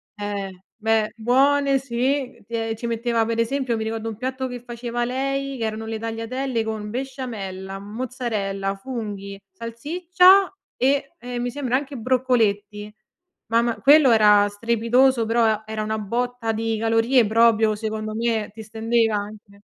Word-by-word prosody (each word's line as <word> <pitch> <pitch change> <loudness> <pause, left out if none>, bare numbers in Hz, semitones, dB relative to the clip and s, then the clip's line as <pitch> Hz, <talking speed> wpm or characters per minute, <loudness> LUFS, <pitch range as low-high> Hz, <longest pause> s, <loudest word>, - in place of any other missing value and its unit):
eh, 200 -3 -5
beh. 220 -1 +1
Buone 275 +4 +3
sì, 260 0 -2
ti 235 - -12
e 225 -1 -1
ci 235 +2 -5
metteva 230 0 0
per 230 0 -2
esempio, 255 +1 0
mi 220 - -2
ricordo 225 0 -3
un 220 - -6
piatto 260 +1 -3
che 245 -1 -6
faceva 240 0 -4
lei 275 +2 -2
che 230 - -2
erano 220 0 -4
le 220 -1 -4
tagliatelle 230 +2 -3
con 220 -1 -4
besciamella, 210 -7 -5
mozzarella, 205 -3 -3
funghi, 200 -4 -6
salsiccia 350 - +3 0.3
e 275 +4 +1
e 245 0 -5
mi 245 0 -2
sembra 255 -2 -1
anche 275 0 -2
broccoletti. 215 -4 0 0.6
Mamma 235 0 +2
quello 280 +1 +7
era 210 -2 +6
strepitoso, 230 +4 +2
però 220 -1 +2
era 215 0 -4
una 215 0 -2
botta 235 +2 -2
di 225 0 -1
calorie 225 +2 +3
proprio 220 -1 +4
secondo 215 0 -4
me, 225 -2 -1
ti 220 0 -9
stendeva 225 0 +1
anche. 205 -1 -9
230 Hz, 145 wpm, -23 LUFS, 215-255 Hz, 0.6 s, quello